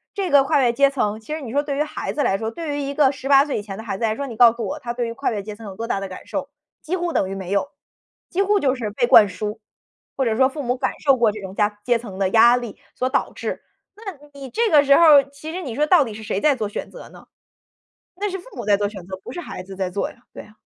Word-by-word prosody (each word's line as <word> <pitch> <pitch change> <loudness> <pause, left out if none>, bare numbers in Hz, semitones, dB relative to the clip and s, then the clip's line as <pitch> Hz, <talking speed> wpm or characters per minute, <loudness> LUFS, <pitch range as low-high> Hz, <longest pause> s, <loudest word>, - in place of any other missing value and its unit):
这 390 -4 -2
个 280 -1 +6
跨 285 0 +2
越 235 -1 +3
阶 280 +2 +4
层， 215 -6 -1
其 220 +5 -12
实 315 - -6
你 245 -5 -7
说 285 +3 +2
对 285 -2 -3
于 295 - +2
孩 305 - -5
子 290 - 0
来 195 - +1
说， 220 0 -2
对 305 +2 -4
于 - - -2
一 280 0 -3
个 285 -2 +4
18 275 +1 +3
岁 290 - -2
以 - - -4
前 195 -2 -8
的 220 - -7
孩 205 -4 -4
子 - - -4
来 220 -1 +1
说， 280 - -4
你 235 - -7
告 235 +1 +7
诉 235 0 -5
我， 300 - -4
他 245 -5 -5
对 240 -1 -2
于 230 - -5
跨 275 +4 -2
越 205 -3 -3
阶 210 +1 -7
层 225 - -13
有 195 - -8
多 230 - -5
大 195 - -1
的 195 - -5
感 185 - -10
受？ 280 -1 -4 0.3
几 340 +3 -2
乎 350 -2 -2
等 190 - +1
于 195 - -4
没 190 -1 -6
有， 200 +8 0 0.6
几 375 - 0
乎 405 +1 +2
就 265 -5 +2
是 230 -5 -4
被 240 +4 +1
灌 210 -4 +7
输， 210 +3 -5 0.6
或 270 - +1
者 225 -2 +1
说 260 +3 +4
父 290 +1 -6
母 250 0 0
感 - - -1
受 275 -2 +6
过 230 -3 +3
这 215 - -8
种 190 -1 -8
家 210 0 0
阶 240 -2 +2
层 205 -5 -9
的 195 -1 +1
压 235 +4 +6
力 240 -4 -7 0.2
所 255 - -1
导 260 - 0
致。 - - -5 0.3
那 400 -5 -8 0.2
你 275 -2 -9
这 460 - 0
个 295 -2 +6
时 280 -1 +5
候 - - +5
儿， 285 -4 +7
其 305 +3 -8
实 370 - -4
你 255 -8 -6
说 300 - +2
到 320 -1 +5
底 225 -5 -7
是 220 - -9
谁 200 -1 -2
在 295 -2 +4
做 220 -4 -3
选 205 - -6
择 - - -11
呢？ - - -16 0.9
那 410 +2 -2
是 385 - -4
父 360 - -13
母 - - -5
在 205 -1 +4
做 205 0 -1
选 200 -4 -10
择， 190 0 -6
不 - - -8
是 350 - -5
孩 185 - -8
子 195 +1 -10
在 190 -1 -3
做 200 +2 -2
呀， - - -18
对 - - -9
呀。 210 - -19
250 Hz, 330 characters per minute, -22 LUFS, 210-290 Hz, 0.9 s, 告